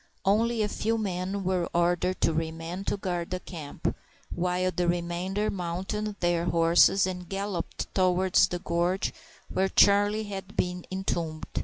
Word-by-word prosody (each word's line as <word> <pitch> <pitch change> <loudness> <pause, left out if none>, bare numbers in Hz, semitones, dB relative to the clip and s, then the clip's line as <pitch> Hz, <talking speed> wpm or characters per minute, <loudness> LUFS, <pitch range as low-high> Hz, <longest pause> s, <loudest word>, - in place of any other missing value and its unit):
Only 225 +3 +2
a - - +1
few 225 +2 -1
men 190 -1 -2
were 185 -2 0
ordered 175 +2 +1
to 165 - +3
remain 165 +3 -3
to - - 0
guard 175 -3 -3
the 185 - -2
camp, 160 -6 -5 0.4
while 180 +1 0
the 175 0 +1
remainder 175 +4 -1
mounted 195 +4 -3
their 175 -1 +1
horses 170 +3 +5
and 180 -2 -5
galloped 195 -3 -3
towards 185 0 +4
the 180 - -3
gorge 175 +2 0 0.4
where 190 0 +1
Charlie 205 +2 +4
had 195 -1 -7
been 180 0 -1
entombed. 170 -4 -3
185 Hz, 145 wpm, -28 LUFS, 175-195 Hz, 0.4 s, horses